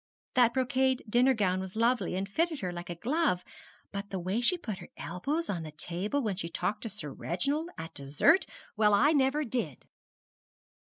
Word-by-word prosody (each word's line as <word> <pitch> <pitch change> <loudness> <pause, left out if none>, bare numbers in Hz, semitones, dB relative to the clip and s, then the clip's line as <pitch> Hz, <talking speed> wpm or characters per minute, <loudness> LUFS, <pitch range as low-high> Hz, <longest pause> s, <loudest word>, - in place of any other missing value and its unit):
That 245 -1 +4
brocade 260 0 +2
dinner 250 +4 +4
gown 185 -4 +1
was 190 +1 -6
lovely, 235 -3 +2
and 190 +1 -1
fitted 320 - 0
her 180 -2 -2
like 175 0 -7
a 175 - -3
glove; 255 - +1 0.5
but 200 0 -5
the 195 - -3
way 185 +6 -1
she 360 +9 +3
put 215 - -5
her 175 - -10
elbows 280 - -2
on 175 -4 -2
the 155 -1 -7
table 180 - -1
when 210 -4 -1
she 170 -3 -3
talked 190 +5 -2
to 225 - -4
Sir 190 -8 -6
Reginald 280 - -1
at 165 0 -7
dessert 150 - +3 0.3
well, 210 -1 +5
I 285 +9 +5
never 290 0 +2
did!' 220 - -3
215 Hz, 190 wpm, -30 LUFS, 180-265 Hz, 0.5 s, well